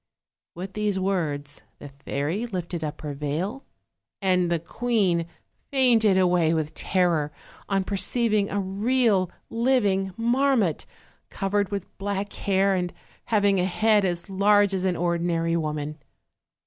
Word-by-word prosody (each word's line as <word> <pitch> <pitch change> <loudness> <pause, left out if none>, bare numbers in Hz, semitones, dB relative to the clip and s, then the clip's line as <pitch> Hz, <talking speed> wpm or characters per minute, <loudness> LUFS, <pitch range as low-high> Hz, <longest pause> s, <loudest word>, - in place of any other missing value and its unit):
With 185 +2 -6
these 210 -2 0
words 150 -7 -2 0.2
the 145 - -10
fairy 145 - -3
lifted 175 -5 -4
up 150 -1 -5
her 150 -2 -4
veil, 155 - -3 0.6
and 180 -3 +2
the 170 - +3
queen 180 -1 0 0.4
fainted 235 -7 +4
away 175 -3 +3
with 155 -1 -2
terror 170 -6 +1 0.4
on 195 -1 +1
perceiving 210 +1 0
a 205 - -1
real 200 0 +1 0.2
liv 245 0 +2
ing 190 -1 0
marmot, 235 - +1 0.4
covered 200 0 -1
with 200 -3 -5
black 200 0 -3
hair, 195 0 +1
and 180 -2 -1 0.3
having 205 -3 +2
a 180 - +2
head 210 +2 +3
as 175 -2 -1
large 200 +1 +3
as 190 -1 -1
an 185 -1 +1
ordinary 170 -1 0
woman. 150 -1 -3
190 Hz, 135 wpm, -25 LUFS, 170-205 Hz, 0.6 s, fainted